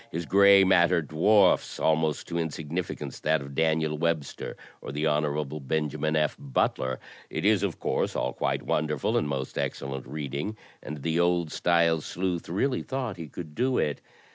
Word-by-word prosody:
His 85 +1 -4
gray 100 +2 +7
matter 90 -2 +4
dwarfs 90 +6 +3
almost 80 -1 +1
to - - -7
insig 80 -2 -3
nificance 90 +1 -4
that 80 +1 +2
of 70 0 -9
Daniel 80 0 +1
Webster 80 -3 -2 0.2
or - - -6
the 75 +2 -2
Hon. 75 -1 0
Benjamin 75 +1 0
F. 75 -1 +1
Butler. 65 -1 -1 0.3
It - - -3
is, 105 -2 +4
of 100 -4 -2
course, - - -1
all - - -1
quite - - -1
wonderful 75 -2 0
and - - +1
most 70 -2 -3
excel 70 - -3
lent 65 -1 -6
reading, 75 +8 -4 0.2
and 75 -2 -7
the 80 0 0
old 85 -2 +2
style 85 -1 +2
sleuth 90 +1 -3
really 125 +9 0
thought 130 -6 -4
he 80 -2 -7
could 75 +1 -8
do 130 +8 +1
it! 75 - 0
80 Hz, 170 wpm, -27 LUFS, 75-90 Hz, 0.3 s, gray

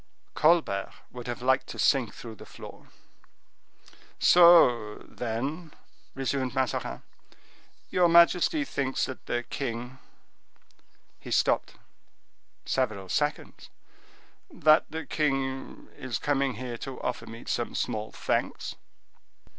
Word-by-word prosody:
Colbert 155 - +2 0.2
would 125 -1 -9
have 120 0 -5
liked 130 +1 +2
to - - -8
sink 130 -5 +2
through 115 -2 -10
the 110 - -12
floor. - - -12 1.3
"So, 145 -12 +6
then," 140 +8 -4 0.4
resumed 135 -1 -2
Mazarin, 130 -2 -2 0.9
"your 180 -1 +4
majesty 175 - +5
thinks 135 - -1
that 130 - -9
the 120 0 -1
king—" 125 0 -5 1.2
he - - -10
stopped - - +1 0.9
several 110 -8 -1
seconds—"that 405 - -2
the 160 +1 -5
king 135 -3 -2
is 130 -5 -4
coming 140 -3 0
here 120 0 -6
to 135 -1 -7
offer 125 - -3
me 115 +1 -9
some - - -2
small 110 0 -2
thanks?" - - -2
135 Hz, 105 wpm, -28 LUFS, 120-160 Hz, 1.3 s, So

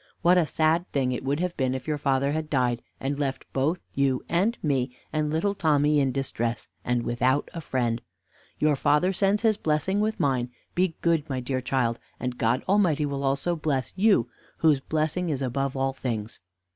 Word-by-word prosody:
What 175 +1 +6
a 165 - +1
sad 160 +3 +1
thing 130 -3 +1
it 125 - -3
would 140 +3 0
have 180 -1 -1
been 130 -1 +1
if 130 -1 -6
your 150 -1 -1
father 140 0 +1
had 155 0 -2
died, 125 -4 +1 0.2
and 140 +1 -2
left 135 -2 -2
both 155 +7 0
you 135 -2 +1
and 195 +8 +1
me, 130 -4 0 0.2
and 155 -1 0
little 165 +6 +1
Tommy 150 -5 +3
in 135 -2 +2
distress, 120 -3 -2 0.2
and 120 -1 0
without 125 +4 +1
a 165 - -5
friend. 120 -5 -1 0.6
Your 150 -1 +3
father 150 +7 +2
sends 200 +3 +1
his 220 -2 +3
blessing 160 +5 0
with 215 +1 0
mine. 130 -3 +1 0.2
Be 180 -2 +1
good, 165 -3 +2
my 130 -2 -1
dear 130 +1 -2
child, 125 -2 0 0.2
and 125 -1 -4
God 115 +2 +1
Almighty 180 -7 +3
will 140 -1 -3
also 140 +6 +1
bless 150 -5 -1
you, 200 +2 +4 0.3
whose 155 -4 +4
blessing 155 +5 -1
is 140 -3 -1
above 135 +2 -1
all 135 0 0
things. 115 -5 -4
140 Hz, 190 wpm, -26 LUFS, 130-165 Hz, 0.6 s, What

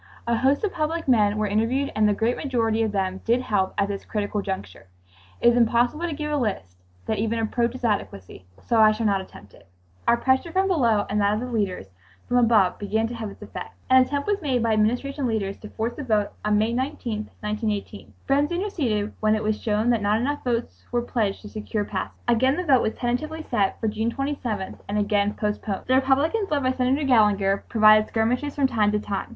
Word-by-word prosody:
A 235 0 +1
host 270 - +2
of 415 - -1
public 325 0 -2
men 210 -5 +3
were 215 - 0
interviewed 230 +7 0
and 215 -1 +3
the - - +3
great 230 +4 +1
majority 230 -5 0
of 220 -2 0
them 190 -1 -2
did 235 +2 +2
help 205 -6 -1
at 200 -1 +2
this 200 -1 -5
critical 205 -1 -2
juncture. 185 - -6 0.5
It 240 - +5
is 240 - +3
impossible 245 +7 +2
to 330 - -3
give 300 0 -4
a 295 - +1
list 190 - -3 0.3
that - - -1
even 225 +2 0
approaches 235 +2 -1
adequacy, 95 - -3 0.2
so 230 - +1
I 215 0 +6
shall 225 +1 -3
not 200 -2 +2
attempt 100 - -14
it. - - -19 0.4
Our 235 - +5
pressure 260 +7 +1
from 380 +3 +2
below 235 - +2
and 210 +1 0
that 205 +1 +2
of - - -2
the 245 - -4
leaders 205 - -2 0.4
from 245 - +1
above 225 -6 +3
began 220 +2 0
to - - -6
have 225 -3 -5
its - - -12
effect. - - -8 0.2
An 260 0 +8
attempt 285 +2 -1
was 410 -1 0
made 260 -6 0
by 225 -1 +2
Administration 245 +6 0
leaders 200 -4 -2
to 215 - -10
force 225 +3 -3
a - - -3
vote 215 -5 +1
on 210 0 +2
May 220 +2 +1
19, 240 -4 -3
1918. 210 -1 -4
Friends 285 +3 +2
interceded 285 - -1
when 215 0 +2
it 215 - -2
was 215 0 -1
shown 215 +2 +1
that 230 -3 +1
not 205 +2 +2
enough 285 +4 -2
votes 240 -1 -3
were 240 0 0
pledged 220 -5 -2
to - - -8
secure 210 0 -3
passage. 190 -2 -5
Again 260 +4 +3
the 360 - -1
vote 270 -7 +4
was 220 - -1
tentatively 305 +6 -3
set 195 -2 +1
for 225 - -1
June 220 +2 -1
27th 250 -8 -4
and 205 - -1
again 205 0 +1
postponed. 210 -2 -3
The 255 - +1
Republicans, 280 +11 +2
led 290 -2 0
by 255 - +2
Senator 260 +3 0
Gallinger, 205 -5 +3
provided 215 -1 +6
skirmishes 245 +6 -1
from 280 - +2
time 220 -5 +2
to 210 - +1
time. 200 -2 -4
225 Hz, 215 wpm, -24 LUFS, 210-260 Hz, 0.5 s, An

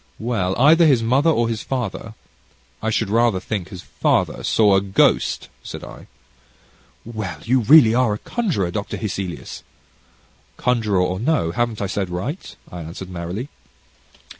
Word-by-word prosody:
"Well, 110 -5 -1
either 160 +5 +6
his 130 -6 +3
mother 135 +8 +3
or 120 -7 +2
his 115 -1 -3
father 115 -3 -4 0.7
I 110 - -1
should 110 -2 -1
rather 115 -3 +3
think 95 -2 -4
his 90 -3 -9
father, - - 0
saw 105 -3 +3
a 95 - +3
ghost," 95 -1 +1
said - - -8
I. - - -11 1.0
"Well, 110 -6 -5
you 130 +3 +2
really 120 -1 +7
are 120 -4 +2
a - - -5
conjurer, 160 - -2
Dr. 100 +3 -4
Hesselius." 95 -4 -5 1.0
"Conjurer 110 -6 +1
or 90 +1 -1
no, 125 - +1
haven't 115 +1 -1
I - - 0
said 95 -1 -2
right?" 100 - -5 0.2
I 90 - -7
answered 85 +3 -8
merrily. 90 +9 -5
110 Hz, 150 wpm, -21 LUFS, 95-125 Hz, 1.0 s, really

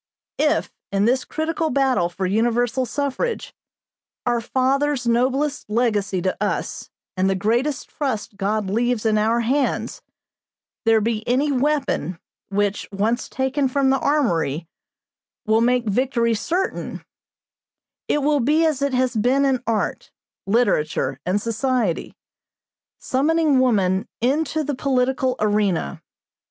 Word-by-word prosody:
"If, - - +1 0.2
in 200 +1 +2
this 250 +2 +2
critical 320 0 -2
battle 255 - +2
for 180 +2 -4
universal 240 +5 +1
suffrage, 285 - -2 0.7
our 240 -1 +1
fathers' 265 +2 0
noblest 260 +4 0
legacy 210 -5 0
to 185 - 0
us - - -3 0.3
and 190 +1 +1
the 195 - +1
greatest 240 +8 0
trust 255 -8 -3
God 205 +1 -1
leaves 235 +3 0
in 215 -1 +3
our 225 +2 +2
hands, 265 +4 -1 0.8
there 225 -1 +4
be 220 0 -1
any 270 +5 +2
weapon, 265 - 0 0.3
which, 205 0 -1
once 215 +5 -1
taken 265 +1 0
from 265 +1 +2
the 270 - +2
armory, 170 - 0 0.8
will 220 +1 +3
make 245 0 +2
victory 235 +1 +1
certain, 345 - -2 1.0
it 295 - +1
will 295 0 +3
be 300 +6 +3
as 305 -4 0
it 280 -2 0
has 255 0 +1
been 255 +6 +2
in 265 -3 +1
art, 220 -3 -1 0.4
literature, 155 - +1
and 190 +3 +2
society, 230 -4 -1 0.8
summoning 300 +1 +2
woman 195 -7 +2
into 300 +5 0
the 290 - -2
political 260 -1 0
arena. 205 - 0
245 Hz, 125 wpm, -22 LUFS, 210-275 Hz, 1.0 s, there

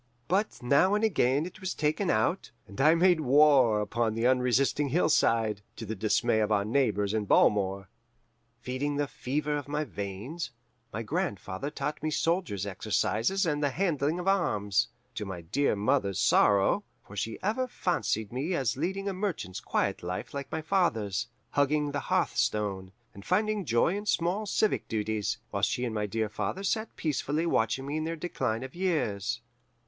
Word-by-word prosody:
But 195 - 0
now 145 +11 +4
and 210 - 0
again 145 - +2
it 185 +4 -10
was 185 -1 -3
taken 155 +6 0
out, 110 0 +1 0.2
and 100 +6 -5
I 155 +4 +6
made 175 0 +4
war 135 -5 +5
upon 110 +1 -1
the 115 +1 0
unresisting 130 +3 +2
hillside, 115 - +2
to 115 - -7
the 110 - -3
dismay 110 +2 +1
of 110 0 +1
our 100 -1 +2
neighbours 105 -4 +1
in 110 -1 0
Balmore. 95 -2 +3 0.7
Feeding 130 +4 -2
the 145 0 +1
fever 150 +2 -2
in 145 0 -6
my 150 +1 0
veins, 115 - -5 0.4
my 115 - -4
grandfather 100 +2 -3
taught 150 0 -4
me 155 - -1
soldiers' 155 - 0
exercises 115 - 0
and 150 -3 0
the 145 - +2
handling 160 -1 0
of 180 +1 -4
arms: 105 - +2 0.3
to - - -4
my 95 -4 -6
dear 105 +11 0
mother's 100 -3 +1
sorrow, 100 - +4 0.2
for 100 - -12
she 110 +3 -3
ever 225 +6 0
fancied 135 - -1
me 150 +8 -1
as 130 -8 0
leading 190 +7 -2
a 200 - -1
merchant's 180 - -3
quiet - - -1
life 90 +7 -5
like 140 -1 -5
my 160 0 -3
father's, 115 - 0 0.2
hugging 145 +1 +1
the 145 - -2
hearthstone, 95 -3 0 0.2
and 100 - -11
finding 210 - 0
joy 120 +8 +2
in 205 +1 -5
small 185 +4 0
civic 210 +2 +1
duties, 110 -2 -1
while - - -2
she 125 - +1
and 115 - -3
my 105 -1 -1
dear 110 +2 -1
father 185 - -3
sat 220 +2 -1
peacefully 155 +1 -1
watching 125 -3 +1
me 145 +2 -2
in 155 - -1
their 165 +1 -2
decline 130 -9 -2
of 130 - -8
years. 120 - -1
135 Hz, 170 wpm, -29 LUFS, 105-165 Hz, 0.7 s, I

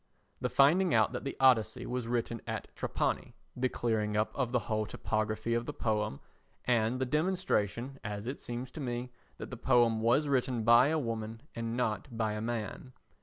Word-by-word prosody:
The - - -1
finding 160 +3 +4
out 110 -1 +4
that - - -5
the 135 - -4
Odyssey 120 -2 +4
was 125 -2 -3
written 115 -1 -1
at - - -5
Trapani, - - -2 0.2
the 130 +1 +1
clearing 105 -3 0
up 110 - +1
of 130 -4 -1
the 125 - +3
whole 110 -2 -1
topography 110 +1 -1
of 115 0 -1
the - - -3
poem, 105 - -1 0.5
and 120 0 +2
the 130 - +1
demonstration, 135 - 0
as 105 0 -4
it 130 +4 -4
seems 120 +1 -5
to 155 - -8
me, 125 -1 -3 0.3
that - - -7
the 125 - -5
poem 120 -2 +3
was 125 +7 +3
written 125 -4 +1
by 120 +3 +7
a 160 +2 +1
woman 115 -3 -4
and 115 0 -3
not 110 -1 -1
by 110 -2 0
a 105 - -3
man. 120 +2 -4
120 Hz, 185 wpm, -31 LUFS, 110-130 Hz, 0.5 s, by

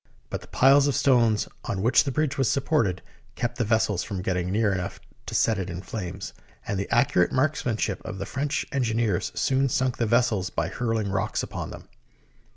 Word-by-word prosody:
But - - -3
the - - -14
piles 140 +2 +5
of 140 - +1
stone 120 -6 +4 0.3
on 95 -1 -2
which 120 - +4
the 140 - -1
bridge 150 0 0
was 135 -4 +1
supported 135 - +1 0.3
kept 120 0 -3
the - - +3
vessels 110 -3 +1
from 95 -4 -5
getting 90 -1 -1
near 105 0 +2
enough 90 -1 -4 0.3
to - - -4
set 110 -3 +2
it 95 -1 -3
in 90 +2 -6
flames, 95 -2 -6 0.3
and 100 - -2
the 100 - -3
accurate 115 -7 +3
marksmanship 125 -8 0
of 105 -3 -6
the 95 - -4
French 145 +5 -2
engi 120 -5 0
neers 110 -6 0
soon 135 0 +2
sunk 130 0 0
the 115 - 0
vessels 115 -4 +2
by - - -2
hurling 115 -4 -1
rocks 95 -1 -1
upon - - -5
them. - - -10
115 Hz, 195 wpm, -26 LUFS, 95-130 Hz, 0.3 s, piles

